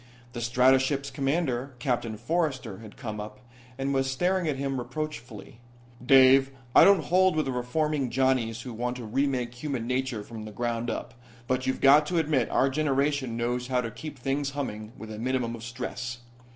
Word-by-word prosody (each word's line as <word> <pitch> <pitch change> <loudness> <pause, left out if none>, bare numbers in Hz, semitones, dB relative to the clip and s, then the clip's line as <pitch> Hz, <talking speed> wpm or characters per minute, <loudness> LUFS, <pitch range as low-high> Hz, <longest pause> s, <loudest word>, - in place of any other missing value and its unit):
The 120 - -5
stratoship's 130 +4 +2
commander, 135 -3 -1
Captain 120 -3 -2
Forrester, 135 - -2
had 110 -2 -12
come 110 -5 -5
up, 105 +2 -8 0.4
and 135 +1 -1
was 135 0 +1
staring 180 +5 0
at 150 - 0
him 135 -1 -2
reproachfully. 120 -6 -6 0.4
"Dave, 135 +1 +6 0.3
I - - +9
don't 195 -5 +6
hold 185 +1 +3
with 155 -2 +1
the 135 - -2
reforming 135 +2 -1
Johnnies 125 -3 +1
who 125 -2 -7
want 125 +2 -2
to 120 - -7
re 135 +6 +1
make 125 -3 -2
human 125 -2 -4
nature 125 -3 -2
from 110 0 -8
the 110 - -8
ground 120 +2 -2
up. 120 - -4 0.3
But 130 +1 -1
you've 130 - -1
got 145 +2 +6
to 175 - -1
admit 150 -7 +1
our 135 +1 +2
generation 140 -3 0
knows 120 +1 -1
how 125 -1 +1
to 115 -2 -3
keep 150 +4 -8
things 135 +2 -1
humming 110 -6 -4
with 110 0 -9
a 105 - -7
minimum 125 -1 -1
of 115 - -10
stress. 120 0 -5
130 Hz, 185 wpm, -27 LUFS, 120-140 Hz, 0.4 s, I